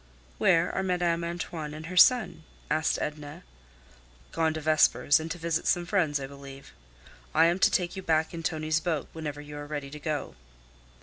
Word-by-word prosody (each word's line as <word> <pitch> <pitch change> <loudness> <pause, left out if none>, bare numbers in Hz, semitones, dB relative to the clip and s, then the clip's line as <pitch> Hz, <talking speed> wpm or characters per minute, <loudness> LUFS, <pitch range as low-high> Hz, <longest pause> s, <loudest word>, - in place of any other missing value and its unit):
"Where 165 +1 +3
are - - -1
Madame 175 -2 0
Antoine 170 -3 -5
and 155 +1 -8
her 180 +2 -7
son?" 180 -5 +5 0.3
asked 155 +1 +1
Edna. 150 -1 -6 0.9
"Gone 160 -1 +1
to - - -3
Vespers, 155 -1 +4
and 160 +1 -6
to 170 - -4
visit 165 -1 -2
some 175 0 +2
friends, 170 -7 +1
I 135 - -5
believe. 140 0 -12 0.6
I 160 +1 +6
am 170 +2 +2
to - - +5
take 180 0 -1
you 190 - -5
back 160 -1 0
in 165 - -5
Tonie's 155 -1 -1
boat 160 -4 -2
whenever 150 -2 -5
you 150 0 -9
are 145 0 -7
ready 145 -2 -5
to 150 - -8
go." 150 -2 -3
160 Hz, 185 wpm, -28 LUFS, 150-170 Hz, 0.9 s, I